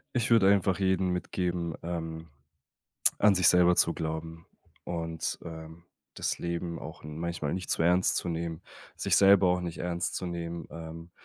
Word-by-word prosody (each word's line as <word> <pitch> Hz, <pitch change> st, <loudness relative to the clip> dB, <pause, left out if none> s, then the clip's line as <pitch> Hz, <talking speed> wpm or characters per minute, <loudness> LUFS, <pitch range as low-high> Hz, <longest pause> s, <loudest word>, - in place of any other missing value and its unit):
Ich 120 Hz, -2 st, +1 dB
würde 110 Hz, -5 st, +5 dB
einfach 95 Hz, -2 st, +3 dB
jeden 95 Hz, -1 st, +1 dB
mitgeben, 90 Hz, -1 st, -2 dB
ähm, 80 Hz, -1 st, -5 dB, 0.9 s
an 105 Hz, -1 st, +5 dB
sich 90 Hz, -3 st, +3 dB
selber 90 Hz, 0 st, +5 dB
zu 85 Hz, -, +4 dB
glauben 80 Hz, +1 st, -5 dB, 0.4 s
und, 80 Hz, -2 st, -3 dB
ähm, 80 Hz, 0 st, -10 dB, 0.3 s
das -, -, -2 dB
Leben 85 Hz, 0 st, -4 dB
auch -, -, -10 dB
n 75 Hz, +1 st, -7 dB
manchmal 85 Hz, -3 st, -3 dB
nicht 90 Hz, -1 st, -4 dB
zu -, -, +1 dB
ernst 90 Hz, +2 st, +3 dB
zu -, -, -1 dB
nehmen. 85 Hz, 0 st, -4 dB, 0.3 s
Sich -, -, +2 dB
selber 100 Hz, -1 st, +6 dB
auch 90 Hz, 0 st, +2 dB
nicht 85 Hz, -1 st, -5 dB
ernst 85 Hz, 0 st, -2 dB
zu -, -, -3 dB
nehmen. 85 Hz, -1 st, -5 dB
Ähm, 85 Hz, +1 st, -9 dB
85 Hz, 165 wpm, -29 LUFS, 80-90 Hz, 0.9 s, selber